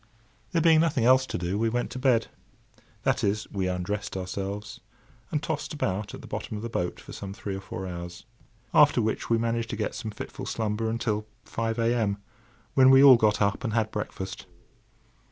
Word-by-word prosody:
There 165 - +1
being 165 -2 +6
nothing 155 -7 +2
else 130 +1 +5
to - - -3
do, 90 +3 -2
we 115 0 +2
went 120 +2 -2
to 130 - -5
bed—that 125 -4 -2
is, 105 +2 0
we 95 -3 -1
undressed 95 +3 -3
ourselves, 100 +3 -5 0.5
and 150 0 -1
tossed 155 -1 -3
about 100 -6 -2
at - - -10
the - - -11
bottom 110 - -4
of 105 - -7
the 115 - -3
boat 90 -5 -2
for - - -11
some 100 -1 -7
three 100 -2 -4
or 95 - -6
four 95 -1 -6
hours. 85 0 -7 0.5
After - - +6
which, 110 0 -1
we 115 - +4
managed 115 0 -1
to - - -3
get - - -2
some 110 - -5
fitful 105 - -7
slumber 110 0 -1
until 110 -2 -1 0.2
five 115 0 -2
a.m., 115 -3 +1 0.6
when 130 -1 +6
we 135 +1 +8
all 135 -2 +10
got 110 -2 +3
up 100 +4 0
and 115 -4 -2
had 110 -2 +1
breakfast. 95 -2 -5
110 Hz, 190 wpm, -27 LUFS, 100-120 Hz, 0.6 s, all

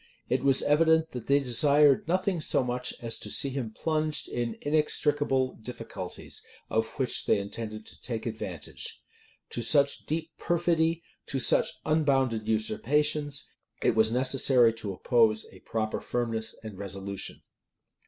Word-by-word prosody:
It - - 0
was 135 -1 +4
evident, 160 +2 +3
that 125 -3 -7
they 140 +1 +4
desired 140 +3 +4
nothing 185 0 0
so 140 - +3
much 125 0 -2
as 115 -1 +2
to - - -6
see 140 -3 +3
him 130 -4 -3
plunged 155 +4 -1
in 120 -2 -3
inextricable 145 -3 +1
difficulties, 110 -6 -7 0.3
of 110 0 +1
which 130 -3 -1
they - - +4
intended 110 +2 -5
to - - -13
take 115 -3 -3
advantage. - - -5 0.5
To 120 - -3
such 140 +3 +3
deep 160 +1 -2
perfidy, 170 -1 +1 0.2
to - - -2
such - - +4 0.2
unbounded 135 -8 +1
usurpations, 145 +6 0 0.4
it - - +3
was 110 0 +3
necessary 125 -1 +4
to 110 -3 -5
oppose 110 +2 +2
a 95 - -14
proper 110 +2 -3
firmness 115 -2 -2
and 105 -4 -8
resolution. 100 0 -6
130 Hz, 140 wpm, -28 LUFS, 110-150 Hz, 0.5 s, was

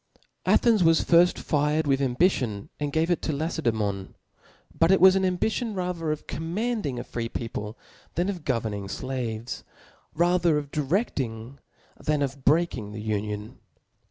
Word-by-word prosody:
' - - -49
Athens 225 -6 +3
was 165 -1 +4
firft 175 +1 +5
fired 150 +1 +1
with 135 -1 +2
ambition 125 - +1
and 145 -1 -2
gave 160 +3 +1
it 175 - +1
to - - -1
LacedsBmon, 115 - -2 0.6
but 165 - +3
it 190 - +5
was 190 0 +8
an 190 - +2
ambition 215 +5 0
ra 180 -1 -1
ther 165 -3 -3
of 155 - -4
commanding 170 - -2
a 120 - -3
free 115 -1 -4
people, 110 -2 -5 0.4
than 175 +3 +1
of 185 -5 -4
govern 115 -6 -1
ing 100 -1 -5
flaves 120 0 -4 0.2
•, - - -36 0.4
rather 175 -1 +3
of 145 -1 -4
direfting 135 - -2 0.4
than 150 -1 +1
of 135 0 -4
breaking 140 -9 +1
the 105 - -6
union. 105 0 -3
150 Hz, 160 wpm, -26 LUFS, 115-175 Hz, 0.6 s, was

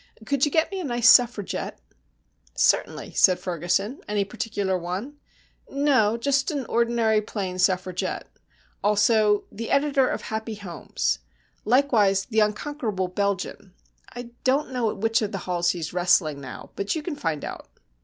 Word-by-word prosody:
Could 280 +3 +2
you 295 - -2
get 320 +4 +2
me 390 - -3
a - - -3
nice 240 -4 +1
Suffragette?" 240 -5 +3 0.8
"Certainly," - - +1
said 185 -1 +5
Ferguson. 185 - -2
"Any 205 -1 0
particular 200 -3 -2
one?" 185 +11 -5 0.5
"No. 265 -6 +2
Just 275 +4 +1
an 285 -5 -3
ordinary, 230 -2 +2
plain 190 -4 -4
Suffragette. 185 -1 0 0.6
Also 210 0 +3
the 225 +2 -6
editor 275 -2 +3
of - - -3
Happy 220 0 -4
Homes. 160 - -3 0.5
Likewise 215 -6 +3
the 220 -3 0
Unconquerable 210 -3 -1
Belgian. 195 0 -3 0.4
I 245 0 -8
don't 270 +2 +1
know 245 -3 0
at - - -5
which 225 +2 +1
of 210 -1 -2
the - - -1
halls 175 -1 0
he's 170 -2 -3
wrestling 175 -5 +2
now, 130 -2 -9
but 200 +7 -2
you 315 - -3
can 330 -2 -4
find 160 - -3
out." - - -8
215 Hz, 150 wpm, -25 LUFS, 185-250 Hz, 0.8 s, said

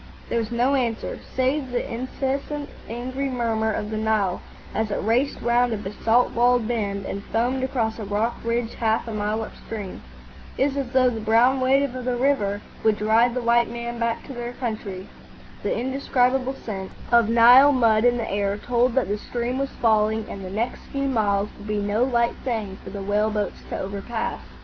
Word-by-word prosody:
There 235 - +1
was 225 -2 -2
no 245 +3 +2
answer, 235 -4 -1 0.2
save 260 +1 +1
the 245 -1 -3
incessant 275 +4 -3 0.2
angry 255 +4 -3
murmur 225 -3 0
of 210 0 -3
the 215 - -2
Nile 215 -4 0 0.3
as 220 -1 -1
it 200 - -1
raced 240 +6 +1
round 240 0 +3
a - - -1
basalt 220 +4 +1
walled 240 -1 +3
bend 200 -4 -2
and 200 - -4
foamed 250 +3 0
across 235 -4 -1
a - - -4
rock 210 +4 -1
ridge 230 0 -1
half 225 0 0
a 225 - -4
mile 210 +1 -1
upstream. 210 -3 -7 0.6
It 275 - +3
was 280 - -6
as 275 -3 -2
though 255 -1 +4
the 225 - -4
brown 235 +5 +3
weight 270 +2 +4
of 255 -2 -3
the 250 0 0
river 225 -7 +1 0.2
would 220 -1 +3
drive 225 +3 +3
the 250 - -2
white 235 0 +3
men 235 0 -5
back 230 0 -1
to 275 - -8
their 240 -1 -5
own 240 - -6
country. 210 -6 -4 0.5
The - - -1
indescribable 260 0 +1
scent 195 -6 -6 0.2
of 235 -2 +5
Nile 245 +5 +8
mud 230 -5 +3
in 245 0 +4
the 230 - -2
air 200 0 0
told 245 +2 +1
that 265 - +2
the 205 +1 -2
stream 240 +3 -3
was 275 0 -1
falling 220 -2 +2
and 195 - -7
the 185 - -6
next 225 +6 -2
few 275 0 -1
miles 205 -5 +1
would 205 - -10
be 210 0 -1
no 205 +3 +1
light 235 -2 +2
thing 215 -6 -3
for - - -8
the 200 -1 -6
whale 205 +2 +1
boats 210 -1 -3
to - - -3
overpass. 200 +4 -4
235 Hz, 195 wpm, -24 LUFS, 215-250 Hz, 0.6 s, Nile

